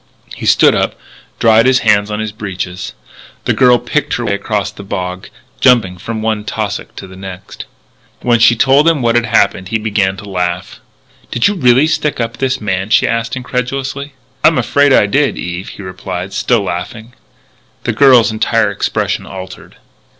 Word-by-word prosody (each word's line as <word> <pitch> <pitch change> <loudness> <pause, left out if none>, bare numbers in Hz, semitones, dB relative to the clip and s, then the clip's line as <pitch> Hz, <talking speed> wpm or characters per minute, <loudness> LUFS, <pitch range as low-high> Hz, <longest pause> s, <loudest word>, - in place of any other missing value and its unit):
He - - -5
stood - - +5
up, - - 0 0.4
dried 115 +1 +4
his 130 0 +3
hands 105 -1 +3
on 105 0 -3
his 110 -1 -3
breeches. 95 -3 -6 0.5
The - - +2
girl 125 -2 +5
picked - - -2
her - - -3
way - - 0
across 100 0 -2
the 105 - -11
bog, 95 -2 -5 0.3
jumping 100 -8 +3
from 110 +3 -5
one 110 -1 -1
tussock 105 0 -4
to - - -8
the 95 0 -13
next. 95 -1 -9 0.6
When 120 -1 +3
she 120 +1 +5
told 135 +6 +4
him 160 -6 +2
what 115 -1 +2
had 120 0 +1
happened 95 -2 +1
he 115 - -1
began 100 -3 -1
to 105 - -10
laugh. 90 -1 -3 0.5
"Did 120 - +2
you 205 - +1
really 130 -5 +4
stick 155 -3 -1
up 115 -1 -3
this 130 -1 -1
man?" 95 -1 -2
she - - +3
asked 115 0 -2
incredulously. 135 +3 -4 0.3
"I'm - - +5
afraid 145 0 +2
I 120 - +5
did, 135 +7 +1
Eve," 90 +2 -5
he 100 - -10
replied, 95 0 -6
still 120 -4 +1
laughing. 100 +6 -6 0.7
The - - -1
girl's 125 -2 +5
entire 110 - +1
expression - - -2
altered. 95 0 -10
110 Hz, 175 wpm, -14 LUFS, 95-125 Hz, 0.7 s, stood